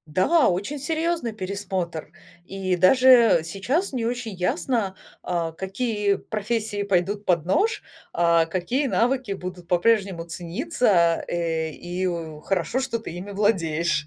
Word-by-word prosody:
Да, 310 - +4
очень 200 +11 -2
серьезный 320 -3 -1
пересмотр. 185 -5 -4 0.3
И 190 -1 -2
даже 235 +1 +6
сейчас 220 - -2
не 240 -4 -2
очень 240 -2 -3
ясно, 190 +3 -1 0.3
а, 170 -2 -1
какие 200 +4 -1
профессии 215 -1 -3
пойдут 200 +2 0
под 175 -5 +2
нож, 415 - +1 0.3
а 170 -1 +3
какие 185 - -1
навыки 250 -2 0
будут 180 -2 -7
по-прежнему 190 0 +2
цениться, 170 - +1
э, 165 -2 -1
и 175 +4 -4
в 160 -4 -4
хорошо, 195 +6 -1
что 255 -3 -2
ты - - -7
ими 180 +4 -7
владеешь. 170 -7 +1
195 Hz, 130 wpm, -24 LUFS, 175-230 Hz, 0.3 s, даже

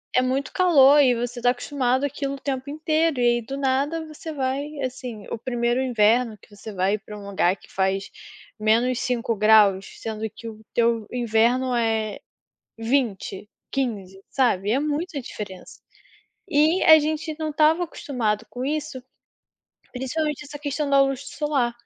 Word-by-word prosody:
É 255 - +5
muito 260 +2 -1
calor 295 -6 +6
e 255 -3 +5
você 240 +1 -4
tá 245 - +4
acostumado 255 +1 0
aquilo 275 -1 -3
o - - -11
tempo 270 0 -4
inteiro 310 -1 0
e, 245 - +2
aí, - - -7
do 270 +5 -6
nada, 280 +4 0
você 310 +1 -8
vai 270 -1 -2 0.2
assim, 250 -4 -5
o - - -3
1º 240 +1 -1
inverno 230 -2 +2
que 205 +1 -19
você 215 +2 -9
vai 195 +2 0
pra 210 0 -11
um 200 - -10
lugar 190 -1 +1
que - - -20
faz 190 0 -1 0.5
-5ºC, 220 -3 +3
sendo 220 0 -4
que 230 - -11
o 220 -1 -9
teu 230 -2 +1
inverno 245 +2 +1
é 225 -2 0 0.6
20, 225 -4 -1 0.2
15, 200 -8 -3
sabe? 210 -7 +1
É 265 - +2
muita 300 +1 -2
diferença. 200 -6 -9 0.7
E 315 +2 +3
a 315 -2 +8
gente 310 +1 -2
não 315 -1 -3
estava 310 +3 +3
acostumado 245 -10 -2
com 250 +1 -6
isso, 295 -2 -3 0.9
principalmente 295 +3 -3
essa 290 0 -9
questão 290 0 -2
da 275 0 +5
luz 270 -1 0 0.2
solar, 285 -5 0
255 Hz, 155 wpm, -24 LUFS, 220-285 Hz, 0.9 s, a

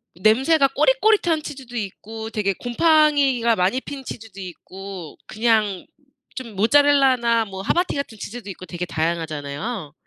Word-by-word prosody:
냄새가 265 - +3
꼬릿꼬릿한 425 - +2
치즈도 260 -4 -8
있고 220 +2 -6
되게 200 -2 0
곰팡이가 275 - +3
많이 190 +7 +1
핀 275 -2 -8
치즈도 220 -5 -9
있고 185 -1 -9
그냥 215 -4 +1 0.5
좀 235 -5 -7
모짜렐라나 255 -1 +4
뭐 190 -1 -7
하바티 350 - 0
같은 280 -6 -4
치즈도 220 0 -7
있고 185 -1 -8
되게 180 0 -5
다양하잖아요. 155 +2 -3
225 Hz, 320 characters per minute, -22 LUFS, 190-275 Hz, 0.5 s, 모짜렐라나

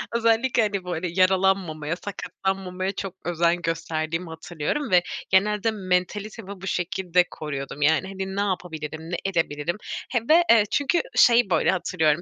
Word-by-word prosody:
özellikle, 230 +2 +3
hani, 200 -3 -1
böyle, 180 0 -2
yaralanmamaya, 185 -4 +2
sakatlanmamaya 190 -1 -3
çok 195 -2 -6
özen 175 0 +1
gösterdiğimi 165 0 -2
hatırlıyorum 160 - -3
ve 180 -1 +6 0.3
genelde 210 +3 +2
mentalitemi 200 +1 -3
bu 190 - -6
şekilde 180 0 +1
koruyordum. 140 -1 -6
Yani, 160 +5 +3
hani, 190 0 -5
ne 200 - 0
yapabilirim, 160 -5 -4
ne - - 0
edebilirim 170 -2 -1 0.3
he 240 - +1
ve, 335 +3 +7
eee, 230 -2 +7
çünkü 290 +5 +2
şey, 235 -4 +5
böyle, 170 - +3
hatırlıyorum, 160 -3 +1
185 Hz, 140 wpm, -24 LUFS, 165-200 Hz, 0.3 s, ve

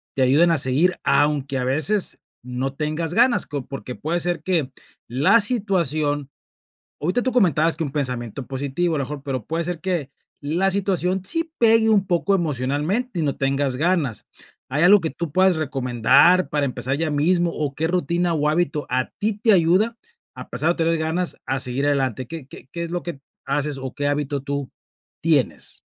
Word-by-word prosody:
te 135 - 0
ayuden 155 +7 +4
a 165 - +2
seguir 145 +8 +2
aunque 145 -2 +2
a 125 - -1
veces 160 +10 +1 0.2
no 125 +2 -3
tengas 155 +3 -2
ganas?, 240 +3 +3
co 145 -3 -5
porque 130 -2 -7
puede 170 +3 -2
ser 175 -2 0
que 160 -8 0 0.4
la 145 - +4
situación, 155 - +1 0.7
ahorita 180 +11 0
tú 255 0 -1
comentabas 165 - +2
que 165 - -2
un 140 - -5
pensamiento 125 -3 -3
positivo, 140 +5 -2
a - - -1
lo 140 - -1
mejor, 145 0 -7
pero 130 -5 -4
puede 165 +1 -2
ser 175 -1 -3
que 175 -8 -2 0.3
la 170 +7 0
situación 190 -1 0
sí 330 - 0
pegue 225 -1 +4
un 200 -3 +3
poco 190 +2 +1
emocionalmente 165 - -1
y - - -1
no 140 -3 -1
tengas 135 -1 0
ganas, 155 - 0 0.4
¿Hay 150 +4 +1
algo 200 +3 +7
que 160 - -2
tú 155 0 -6
puedes 185 -1 +3
recomendar 135 +4 +3
para 145 -2 0
empezar 130 +1 -2
ya 160 -1 0
mismo, 170 +4 +2
o 145 -2 -3
qué 160 - -1
rutina 175 -1 0
o 150 0 +1
hábito 160 -2 -1
a 130 0 0
ti 215 +1 0
te 215 +2 +2
ayuda 190 +7 +2 0.4
a - - -10
pesar 160 - 0
de - - +4
no - - -16
tener 165 - +1
ganas 160 +3 -2
a 135 - -1
seguir 130 +2 +1
adelante? 130 -4 0
¿Qué 155 -2 -8
qué 135 - -13
qué 170 - -5
es 170 - -5
lo 175 0 -3
que 170 -5 -6 0.3
haces 145 0 -1
o 130 -1 -6
qué 145 0 -1
hábito 145 -1 -2
tú 140 -1 -4 0.5
tienes? 150 -7 0
155 Hz, 190 wpm, -22 LUFS, 140-180 Hz, 0.7 s, algo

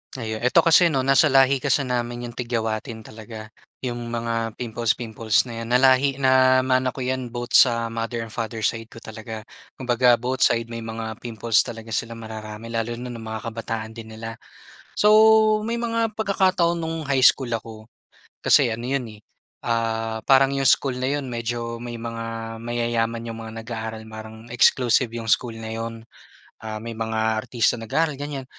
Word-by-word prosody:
Ayun, 110 -3 -4
eto 125 +1 +4
kasi 170 +1 +6
'no, 135 -5 0
nasa 135 +3 +5
lahi 135 0 +4
kasi 140 +1 +1
namin 120 -1 -3
yung - - -19
tigyawatin 115 -1 -3
talaga, 110 0 -10 0.3
yung 120 -1 -4
mga 115 -1 -2
pimples-pimples 115 -2 0
na 120 -2 -8
'yan. 115 - -5
Nalahi 130 +2 +4
namana 130 -1 +3
ko 130 - -4
'yan 130 -1 -2
both 120 +1 -6
sa 115 -2 +5
mother 115 0 -3
and 110 - -10
father 115 -1 -4
side 115 +2 -1
ko 115 - -14
talaga. 110 0 -8 0.3
Kumbaga, 125 -1 +3
both 125 +2 -3
side 115 0 -1
may 115 - -5
mga 110 0 -6
pimples 115 -2 0
talaga 115 -2 -3
sila 115 +1 -2
mararami 110 0 -8
lalo 115 +1 -2
na 125 +1 -7
nung 115 -2 -8
mga 110 +1 -5
kabataan 110 0 -5
din 110 -1 -10
nila. 115 +1 -7 0.6
So, 210 - +5 0.6
may 235 +1 -2
mga 230 -1 0
pagkakataon 185 -4 +2
no'ng 165 -2 -4
high 135 -2 +2
school 130 -1 +5
ako, 110 0 -9 0.6
kasi - - +5
ano 115 - -7
'yon 135 -3 -1
eh, 105 - -16 0.4
ah, 115 -1 -1
parang 135 0 +5
yung 135 -1 0
school 130 -1 +3
na 130 - -1
'yon 140 -2 -2
medyo 115 0 -3
may 120 0 -7
mga 115 -1 -6
mayayaman 115 0 -1
yung 115 - -7
mga 115 0 -7
nag-aaral 110 -1 -6
parang 110 +1 -10
exclusive 120 +1 +4
yung 115 -1 -3
school 120 -3 +2
na 110 0 -7
'yon. 115 0 -4 0.7
Ah, 110 -1 -6
may 115 +2 -6
mga 110 0 -1
artista 115 0 0
nag-aaral, 145 +5 -1
ganyan. 145 -2 -5
115 Hz, 170 wpm, -23 LUFS, 115-130 Hz, 0.7 s, kasi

